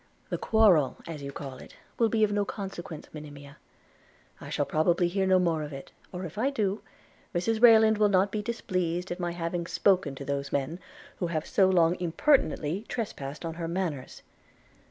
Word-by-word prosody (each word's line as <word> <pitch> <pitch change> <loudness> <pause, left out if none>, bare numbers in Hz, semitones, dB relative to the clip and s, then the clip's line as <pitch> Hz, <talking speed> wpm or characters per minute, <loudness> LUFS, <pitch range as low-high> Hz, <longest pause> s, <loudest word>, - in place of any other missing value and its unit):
'The - - 0
quarrel, 195 - +4
as 160 -3 -7
you 140 0 -6
call 135 -2 -7
it, - - -13 0.2
will 230 -1 +4
be 220 -1 +2
of 210 - +3
no 205 0 +1
consequence, 190 -6 -7
Monimia: 145 -1 -10 0.8
I - - -8
shall - - 0
probably 170 +3 +2
hear 190 +2 0
no 190 0 +5
more 170 -3 +1
of 150 0 -5
it; 135 -1 -9
– - - -30
or, 180 0 -5
if 175 +5 -7
I 260 +5 +2
do, 210 -7 -1 0.5
Mrs 220 +6 0
Rayland 220 -2 +7
will 210 -1 +4
not 195 0 +3
be 215 - -2
displeased 185 -5 -2
at 175 - -4
my 175 -1 -2
having 170 0 -3
spoken 180 -10 +2
to 140 - -8
those 140 0 -3
men, 140 +5 -2 0.4
who 175 - -1
have 160 -2 -2
so 190 -1 +3
long 175 -1 +3
impertinently 175 - +1
trespassed 155 - -5
on 165 - -3
her 165 0 -5
manors.' 165 -6 -4
175 Hz, 190 wpm, -28 LUFS, 155-200 Hz, 0.8 s, Rayland